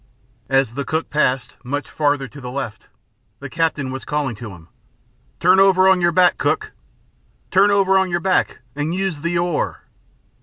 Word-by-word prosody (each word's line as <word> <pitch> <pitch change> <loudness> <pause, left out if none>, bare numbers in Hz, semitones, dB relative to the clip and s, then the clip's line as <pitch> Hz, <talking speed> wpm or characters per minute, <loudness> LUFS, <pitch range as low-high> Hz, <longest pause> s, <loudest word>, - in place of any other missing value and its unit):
As 135 -3 +2
the 140 +3 -3
cook 160 +4 -3
passed, 130 -4 0
much 145 +3 -4
farther 145 -3 0
to 140 +2 -12
the 125 - -6
left, 125 -4 -6 0.5
the - - -8
captain 155 -5 -1
was 130 0 -6
calling 145 -4 -2
to 115 0 -8
him, 85 -4 -13 0.7
"Turn 185 +2 +5
over 190 -1 +5
on 190 -1 +4
your 175 0 +3
back, 180 +1 +3
cook! 430 0 -1 0.8
Turn 195 +2 +5
over 195 -1 +3
on 190 -1 0
your 175 0 0
back 185 +1 0
and 150 +4 -2
use 190 -5 -2
the 170 +1 -1
oar." 170 -2 -2
155 Hz, 175 wpm, -20 LUFS, 135-185 Hz, 0.8 s, Turn